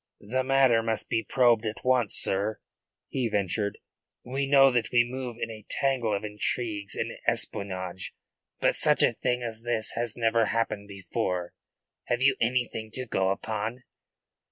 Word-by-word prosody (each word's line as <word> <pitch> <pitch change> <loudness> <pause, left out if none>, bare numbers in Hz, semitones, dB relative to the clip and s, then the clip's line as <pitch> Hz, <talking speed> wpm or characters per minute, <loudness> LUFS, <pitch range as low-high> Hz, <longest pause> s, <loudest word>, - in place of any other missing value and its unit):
"The 130 +6 -1
matter 130 -3 +4
must 110 -1 -2
be 115 - +1
probed 120 -3 +3
at 110 +2 -5
once, 125 -5 +2
sir," 105 +2 +1 0.5
he 125 -4 -1
ventured. 100 0 -1 0.5
"We 135 +2 -2
know 135 -1 +6
that 120 -2 0
we 120 -1 +5
move 125 -1 -5
in 115 - -3
a 110 -1 -10
tangle 130 -5 0
of 100 - -9
intrigues 105 0 -2
and - - -2 0.2
espionage. 95 -2 -2 0.5
But - - +3
such - - +4
a - - +4
thing 125 0 -1
as 115 -1 -5
this 120 -2 +1
has 115 -1 -2
never 115 -1 +3
happened 110 -2 -1
before. 95 -2 -3 0.5
Have 120 +1 0
you 140 - +5
anything 115 -2 0
to 130 - -4
go 95 -5 0
upon?" 110 +5 -3
115 Hz, 155 wpm, -27 LUFS, 105-125 Hz, 0.5 s, know